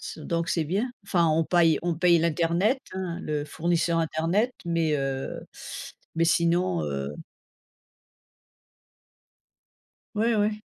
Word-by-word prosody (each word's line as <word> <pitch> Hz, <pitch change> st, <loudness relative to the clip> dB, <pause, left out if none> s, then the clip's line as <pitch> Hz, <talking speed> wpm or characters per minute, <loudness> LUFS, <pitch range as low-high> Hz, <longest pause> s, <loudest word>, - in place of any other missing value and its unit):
c' -, -, -7 dB
donc 170 Hz, +2 st, -2 dB
c'est 165 Hz, -, +1 dB
bien, 200 Hz, -, -1 dB
enfin 175 Hz, -4 st, +2 dB
on 160 Hz, +1 st, +2 dB
paille 165 Hz, -2 st, +4 dB
on 175 Hz, -1 st, 0 dB
paye 170 Hz, +1 st, +4 dB
l'Internet, 170 Hz, -, +2 dB
hein, 185 Hz, -2 st, -4 dB
le 150 Hz, -1 st, -2 dB
fournisseur 170 Hz, +2 st, 0 dB
Internet, 165 Hz, +9 st, +1 dB
mais 165 Hz, -2 st, +1 dB
heu, 135 Hz, -1 st, -3 dB, 0.7 s
mais 165 Hz, +1 st, +2 dB
sinon 170 Hz, -, +2 dB
heu 70 Hz, 0 st, -3 dB, 3.0 s
Ouais 225 Hz, +2 st, +2 dB
ouais. 210 Hz, +1 st, 0 dB
170 Hz, 115 wpm, -26 LUFS, 160-180 Hz, 3.0 s, paille